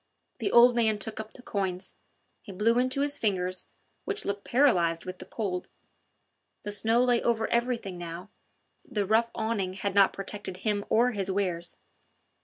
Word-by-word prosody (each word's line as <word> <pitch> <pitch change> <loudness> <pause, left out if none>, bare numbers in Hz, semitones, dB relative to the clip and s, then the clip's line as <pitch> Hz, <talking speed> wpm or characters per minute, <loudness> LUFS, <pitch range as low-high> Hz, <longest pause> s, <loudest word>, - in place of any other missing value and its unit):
The - - -1
old 240 +1 +7
man 220 -3 +2
took 215 +2 -5
up 220 0 -7
the 250 - -14
coins. 190 -4 -3 0.5
He 205 - -10
blew 225 +5 +2
into 255 +2 +1
his 290 0 +2
fingers, 185 -3 -1 0.4
which 410 0 -4
looked 200 0 -3
paralysed 180 -11 +3
with 185 0 -7
the - - -9
cold. 190 -5 -3 1.0
The 205 - -4
snow 225 +4 +2
lay 245 -2 +3
over 225 -2 +1
everything 235 -6 -1
now; 175 +3 -7 0.5
the 210 -6 -2
rough 225 +3 +3
awning 205 -5 -1
had 195 +1 -3
not 200 -1 +5
protected 195 -1 -6
him 205 0 -1
or 245 +3 +4
his 195 -4 -2
wares. 180 -3 -2
210 Hz, 165 wpm, -28 LUFS, 190-235 Hz, 1.0 s, old